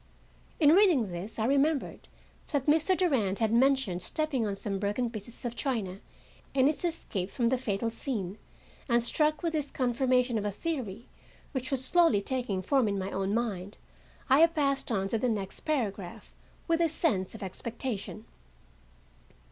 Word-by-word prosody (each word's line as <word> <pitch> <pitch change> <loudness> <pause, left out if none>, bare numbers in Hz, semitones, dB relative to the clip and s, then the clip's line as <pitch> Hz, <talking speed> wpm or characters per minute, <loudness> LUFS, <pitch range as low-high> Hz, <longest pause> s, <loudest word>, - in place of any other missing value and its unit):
In 300 -3 +6
reading 330 - +4
this 175 +5 -6
I 220 - 0
remembered 280 +2 +1 0.4
that 285 -4 -1
Mr. 320 +5 +4
Durand 240 - +1
had 225 -1 +1
mentioned 255 -7 +3
stepping 270 - 0
on 200 - -2
some 195 0 -3
broken 210 +4 -1
pieces 225 +2 -7
of 240 0 -3
china 215 -10 -2 0.6
in 260 -1 +4
his 295 +4 +1
escape 220 - -2
from 235 +2 0
the 260 - +2
fatal 225 -1 -1
scene, 215 -6 -4 0.5
and, 235 0 +3
struck 305 +6 +1
with 335 -1 0
this 295 -3 -1
confirmation 250 -1 +1
of - - -4
a - - +1
theory 235 - -4 0.4
which 260 -1 -3
was 265 -2 0
slowly 335 - +4
taking 205 -4 -2
form 265 +2 +2
in 200 -1 -1
my 190 0 -3
own 195 +2 -1
mind, 205 -5 -3 0.5
I 275 +4 +6
passed 280 -5 0
on 195 -3 0
to 225 - 0
the 250 - +1
next 200 -4 -3
paragraph, 220 - -3 0.3
with 330 0 +2
a 335 - +3
sense 220 - 0
of 220 - -7
expectation. 220 +2 -5
240 Hz, 165 wpm, -29 LUFS, 205-280 Hz, 0.6 s, In